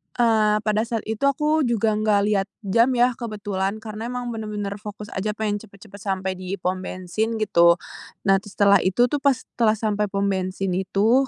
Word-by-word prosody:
Eee, 220 -3 +3
pada 215 0 +1
saat 230 -1 -2
itu 220 +5 -1
aku 300 +3 +2
juga 225 -2 +1
nggak 210 -1 +2
lihat 205 -2 +1 0.2
jam 230 +6 +4
ya 245 +1 +4
kebetulan, 205 -4 -3
karena 220 +1 -6
emang 245 -1 -4
benar-benar 210 -2 -4
fokus 210 0 -8
aja 210 +2 -2
pengen 210 -1 -1
cepet-cepet 200 -1 -14
sampai 190 -1 -2
di 185 +1 -4
pom 185 +1 -2
bensin 185 +5 -3
gitu. 170 -5 +5 0.5
Nah 195 0 +4
setelah 200 -1 +3
itu 190 +6 +3
tuh 290 - 0
pas 280 -2 +4 0.2
telah 220 -2 +4
sampai 210 -1 0
pom 200 0 -1
bensin 190 0 -1
itu, 205 +8 +2
210 Hz, 175 wpm, -23 LUFS, 195-225 Hz, 0.5 s, gitu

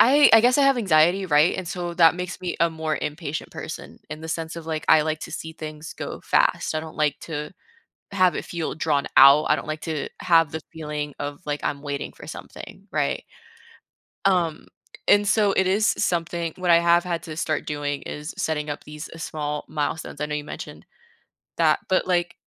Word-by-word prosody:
I 285 +4 +7
I 225 - +9
guess 250 +3 +4
I 285 - +5
have 275 -2 +4
anxiety, 180 -1 +3
right, 150 +1 +4
and 185 -3 -4
so 175 -2 -4
that 165 0 +6
makes 180 0 -5
me 180 -1 -3
a 170 0 +3
more 160 -1 -2
impatient 150 0 -4
person, - - -8
in 155 +1 -7
the 160 - -7
sense 165 0 -4
of, 165 - -8
like, 160 -1 -3
I 155 -1 +7
like 155 0 -2
to - - -7
see 160 0 -6
things 155 0 -8
go - - -6
fast. - - +1
I 155 - 0
don't 160 0 -10
like 150 -2 +1
to 150 +1 -4 0.6
have 185 -2 +3
it - - -4
feel 170 -2 -3
drawn 150 -3 0
out. 140 +3 +8
I 150 - +4
don't - - -7
like 155 0 -4
to 155 -3 -3
have 165 -3 +4
the 160 - -4
feeling 150 -2 -4
of, 145 0 -5
like, 145 0 -2
I'm 140 -1 -2
waiting 140 -1 -4
for - - -12
something, - - -10
right? - - -1 1.0
Um, 175 -5 +1 0.4
and 205 0 +5
so 205 -1 +3
it 190 - +2
is 205 +4 +3
s - - 0
something 170 -1 -1
what 180 -1 0
I 170 - +8
have 170 0 +4
had 170 -2 -2
to 155 -2 -7
start 155 -1 -1
doing 145 -1 -3
is 150 +1 -7
setting 150 -1 -2
up 145 - -5
these 150 +1 -8
s 165 - -6
small 150 -1 -4
milestones. 150 +1 -3
I 150 - 0
know 150 - -4
you 150 - -3
mentioned - - -8 0.7
that, - - +3
but, 185 - +2
like 175 -1 0
160 Hz, 210 wpm, -24 LUFS, 150-175 Hz, 1.0 s, I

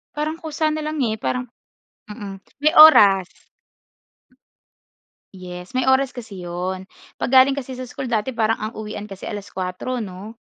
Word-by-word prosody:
Parang 305 +1 -2
kusa 315 0 -1
na 310 0 -3
lang, 305 0 -3
eh, 220 - -1
parang, 250 +3 -3 0.6
mm 205 -2 -7 0.3
May 305 +1 +3
oras. 200 - +8 2.0
Yes. 180 +1 -9
May 255 0 -1
oras 265 0 +3
kasi 210 -7 -9
'yon. 180 +2 -4 0.3
'Pag - - -3
galing 265 +1 +6
kasi 270 -2 -6
sa 255 0 -7
school 250 0 -6
dati 230 +3 -1
parang 225 -1 +1
ang 215 +1 -5
uwian 210 -1 -6
kasi 195 -2 -11
alas-kuwatro 205 +3 -4
'no? 200 +4 -9
225 Hz, 150 wpm, -21 LUFS, 195-265 Hz, 2.0 s, oras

